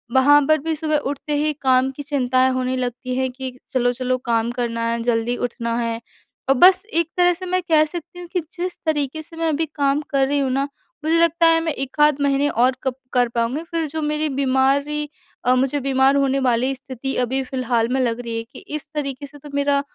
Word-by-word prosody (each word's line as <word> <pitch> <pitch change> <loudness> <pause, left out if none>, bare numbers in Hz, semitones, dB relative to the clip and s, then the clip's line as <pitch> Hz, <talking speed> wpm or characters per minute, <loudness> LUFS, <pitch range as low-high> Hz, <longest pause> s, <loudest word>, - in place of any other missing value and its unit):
वहाँ 290 +3 +6
पर 310 - +5
भी 320 +1 -1
सुबह 310 0 0
उठते 290 +1 -5
ही 300 +1 +1
काम 260 0 +3
की 285 +2 -8
चिंताएँ 260 -2 +2
होने 255 0 -1
लगती 250 0 -3
हैं 260 0 0
कि 260 0 -7 0.2
चलो-चलो 255 0 +1
काम 230 -1 +1
करना 235 -2 -2
है 235 0 -2
जल्दी 235 0 0
उठना 235 -1 -2
है। 230 -1 -2 0.5
अ, 270 - +7
बस 370 +7 +6
एक 335 0 +1
तरह 355 0 +5
से 360 +2 -7
मैं 365 0 0
कह 310 -1 +6
सकती 345 +2 -8
हूँ 350 - -8
कि 365 - +2 0.2
जिस 360 +1 -3
तरीके 305 -1 -1
से 320 +1 -11
मैं 330 - 0
अभी 315 +1 0
काम 285 0 +1
कर 270 -1 +2
रही 285 +1 +1
हूँ 270 -2 0
ना 275 +2 0 0.4
मुझे 325 +1 +3
लगता 335 0 +3
है 330 0 +5
मैं 325 -1 -1
एकाध 290 +1 +1
महीने 280 0 +2
और 255 +1 +2
कप 265 -2 -1 0.2
कर 245 -1 +3
पाऊँगी 235 +5 -1
फिर 330 -1 -1
जो 315 +2 -4
मेरी 300 +1 0
बीमारी 280 +2 +1 0.4
अ, 250 +1 +4
मुझे 270 +3 +1
बीमार 270 0 +3
होने 275 -1 +2
वाली 255 0 +1
स्थिति 265 0 -6
अभी 260 +2 -1
फिलहाल 250 -3 -1
में 265 - +1
लग 235 -2 0
रही 230 -1 -5
है 230 - -3
कि 250 +4 -14 0.2
इस 300 -1 -6
तरीके 285 -1 -3
से 290 +1 -14
तो 295 +1 -12
मेरा 280 0 +2
275 Hz, 215 wpm, -21 LUFS, 255-300 Hz, 0.5 s, अ